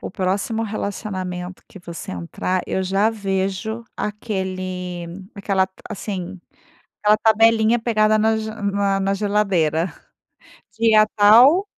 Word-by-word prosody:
o - - -6
próximo 195 +5 -1
relacionamento 185 -4 -5
que - - -12
você 170 -2 -8
entrar, 95 - -3
eu 190 - -1
já 195 +4 +2
vejo 200 +2 -3
aquele 185 -4 -4 0.3
aquela, 195 -2 0 0.2
assim, 190 -2 -5 0.6
aquela 210 0 +4
tabelinha 225 +1 +4
pegada 215 -2 +2
na 220 +1 +2
g 220 0 -4
na 200 -2 -1
na 195 0 0
geladeira, 190 -5 +1 0.9
dia 220 -2 +5
tal 245 - +6
200 Hz, 110 wpm, -21 LUFS, 185-220 Hz, 0.9 s, tal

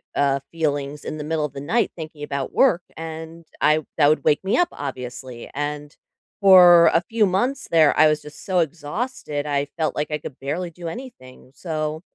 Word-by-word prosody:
uh, 140 -1 +2
feelings 145 -3 -2
in 155 - -5
the 150 - -5
middle 155 0 -1
of 140 - -7
the 140 - -7
night 225 +11 0
thinking 155 -3 -9
about 140 -2 -4
work, 190 -10 +3
and 160 +1 -8 0.2
I 155 +1 +4 0.2
that 145 -2 +5
would 155 -2 +1
wake 150 - +2
me 195 - +1
up, 350 -1 +3
obviously, 125 -3 -7
and 145 +1 -4 0.5
for 180 -3 +8
a 165 - +4
few 225 -2 +2
months 245 +9 -1
there, 160 -3 +4
I 155 +1 +7
was 155 0 +1
just 150 0 -12
so 185 -2 +1
exhausted, 155 - -3
I 145 -1 0
felt 160 -2 -1
like 150 - -2
I 150 - 0
could 145 -2 -10
barely 165 +6 -3
do 170 +1 -8
anything, 165 - -10
so, 155 -1 -4
155 Hz, 195 wpm, -22 LUFS, 145-175 Hz, 0.5 s, for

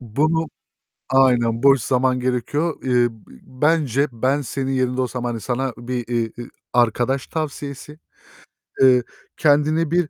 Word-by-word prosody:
Bunu, 155 +8 0 0.6
aynen 120 -3 +3
boş 135 -3 +5
zaman 130 +1 +1
gerekiyor. 130 +6 -2
Eee, 125 -2 +3
b 110 -2 -19 0.3
bence 150 -3 +2
ben 130 +5 0
senin 135 +1 -3
yerinde 130 -1 0
olsam, 125 -1 -3
hani, 120 -2 -3
sana 130 +1 -2
bir, 120 0 -4
iii, 115 -2 -2
eee, 120 - -8 0.2
arkadaş 120 +3 +1
tavsiyesi, 150 -1 -6 0.8
eee, 125 -2 +6 0.3
kendine 155 +2 +2
bir 175 -3 +1
130 Hz, 130 wpm, -21 LUFS, 120-145 Hz, 0.8 s, eee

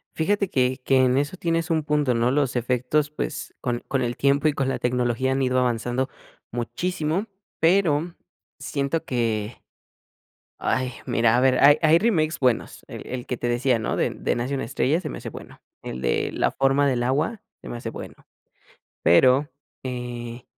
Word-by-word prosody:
Fíjate 200 +3 +1
que 130 -3 +1
que 135 - +3
en 125 +1 +2
eso 145 +6 -1
tienes 165 0 -1
un 160 -2 +1
punto, 150 -4 +1
¿no?, 120 +2 +2
los 135 -2 0
efectos, 125 +5 0
pues, 150 0 -5
con 120 -2 -2
con 135 -2 0
el 120 -1 -2
tiempo 140 +2 +2
y 150 - +2
con 135 -2 -1
la - - -2
tecnología 125 +1 0
han 135 - 0
ido 130 0 +2
avanzando 125 +1 0 0.4
muchísimo, 160 - -2 0.3
pero, 170 -1 +2 0.4
siento 140 +3 -2
que, 115 -3 -2 1.0
¡ay!, 130 -1 -1
mira, 115 +1 +3
a - - +4
ver, 130 -1 +3
hay 145 +2 +7
hay 160 +1 +5
remakes 165 -8 +1
buenos. 125 -4 0
El - - -9
el 125 -1 -5
que 125 - -3
te 120 - -3
decía, 120 0 +2
¿no?, 110 - -2
de - - +1
de - - -2
Nace 125 +4 -2
una 135 - -2
estrella, 140 +6 +1
se 155 - -5
me - - -6
hace - - -6
bueno. - - -12 0.2
El 65 - -6
de - - 0
La - - 0
forma 135 +1 +2
del 120 -2 0
agua 150 - 0 0.2
se - - -10
me 120 - -5
hace 115 -1 -5
bueno. - - -8 0.9
Pero, 130 - +5 0.3
eh, 120 -1 -6
130 Hz, 180 wpm, -24 LUFS, 120-150 Hz, 1.0 s, hay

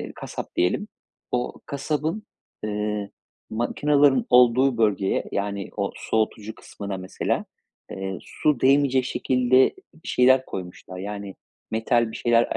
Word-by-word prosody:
ııı, - - -6
kasap - - -7
diyelim. 90 - +1 0.4
O 125 0 -1
kasabın, 150 +7 -2 0.4
ııı, 105 -1 -2 0.4
makinaların 140 +4 +2
olduğu 125 +1 +5
bölgeye 100 -3 +1
yani 100 -1 -2
o 100 -1 -1
soğutucu 110 -1 -1
kısmına 100 -3 -7
mesela, 95 0 -2 0.5
ııı, 95 -1 -4
su 150 -5 0
değmeyecek 135 -1 +4
şekilde 130 0 +3 0.2
bir 160 - -12
şeyler 130 +1 +5
koymuşlar. 90 0 -7
Yani 100 0 -6 0.4
metal 115 +1 +1
bir - - -6
şeyler 120 0 +2
115 Hz, 120 wpm, -24 LUFS, 100-130 Hz, 0.5 s, olduğu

